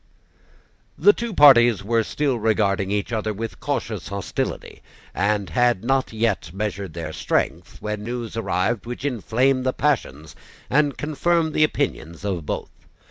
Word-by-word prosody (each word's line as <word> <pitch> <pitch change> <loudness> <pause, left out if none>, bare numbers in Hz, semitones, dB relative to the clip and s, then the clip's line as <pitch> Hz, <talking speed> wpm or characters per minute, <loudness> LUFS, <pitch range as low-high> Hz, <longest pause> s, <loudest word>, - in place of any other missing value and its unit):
The 415 - +6
two 235 - -4
parties 120 - +6
were 115 +2 +2
still 135 +1 -1
regarding 105 -3 +1
each 105 +3 -2
other 110 -1 -1
with 115 +2 -6
cautious - - -3
hostility, - - -4 0.3
and 100 -2 0
had 120 0 +2
not 135 +2 +1
yet 110 -6 -1
measured 100 -2 -4
their 80 -2 -5
strength, - - -2
when 105 0 -3
news 120 0 -5
arrived 115 +1 -1
which 120 +3 -5
inflamed 130 +1 +1
the 130 0 0
passions 80 - -1 0.4
and 145 0 +2
confirmed 160 +2 0
the 155 - +3
opinions 105 - -2
of 90 -7 -3
both. - - -4
115 Hz, 140 wpm, -23 LUFS, 100-135 Hz, 0.4 s, The